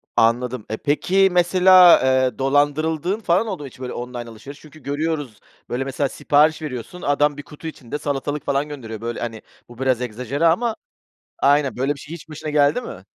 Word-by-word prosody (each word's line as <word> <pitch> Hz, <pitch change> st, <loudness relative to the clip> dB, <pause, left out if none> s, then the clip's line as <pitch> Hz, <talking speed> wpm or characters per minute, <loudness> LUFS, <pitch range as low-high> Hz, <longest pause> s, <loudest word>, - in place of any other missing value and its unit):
Anladım. 120 Hz, 0 st, +1 dB
E, 110 Hz, -, -3 dB
peki, 190 Hz, +9 st, +2 dB
mesela, 180 Hz, 0 st, +6 dB
eee, 130 Hz, -2 st, +2 dB
dolandırıldığın 150 Hz, +7 st, +1 dB
falan 190 Hz, +1 st, +1 dB
oldu 190 Hz, -8 st, -5 dB
mu -, -, -6 dB
hiç? 125 Hz, -, -15 dB
Böyle 125 Hz, -1 st, -5 dB
alışveriş. 120 Hz, +2 st, -8 dB
Çünkü 155 Hz, 0 st, -16 dB
görüyoruz, 145 Hz, -5 st, -3 dB, 0.3 s
böyle, 125 Hz, +2 st, -2 dB
mesela 135 Hz, +1 st, -2 dB
sipariş 150 Hz, +4 st, +2 dB
veriyorsun. 150 Hz, +4 st, -7 dB
Adam, 145 Hz, -1 st, +1 dB
1 145 Hz, -, -7 dB
kutu 150 Hz, +2 st, -10 dB
içinde 145 Hz, -3 st, -6 dB
salatalık 145 Hz, 0 st, -3 dB
falan 140 Hz, +2 st, 0 dB
gönderiyor. 115 Hz, -7 st, -8 dB
Böyle, 120 Hz, 0 st, -4 dB
hani, 115 Hz, -2 st, -5 dB, 0.3 s
bu 120 Hz, 0 st, -14 dB
biraz 130 Hz, -2 st, +1 dB
egzajere 125 Hz, +6 st, -2 dB
ama. 220 Hz, +8 st, +2 dB, 0.7 s
Aynen, 140 Hz, -1 st, +3 dB
böyle 135 Hz, +3 st, 0 dB
bir -, -, -14 dB
şey 155 Hz, -, -9 dB
hiç 170 Hz, -1 st, -12 dB
başına 155 Hz, 0 st, -6 dB
geldi 145 Hz, +8 st, +3 dB
mi? -, -, -9 dB
145 Hz, 180 wpm, -21 LUFS, 125-160 Hz, 0.7 s, mesela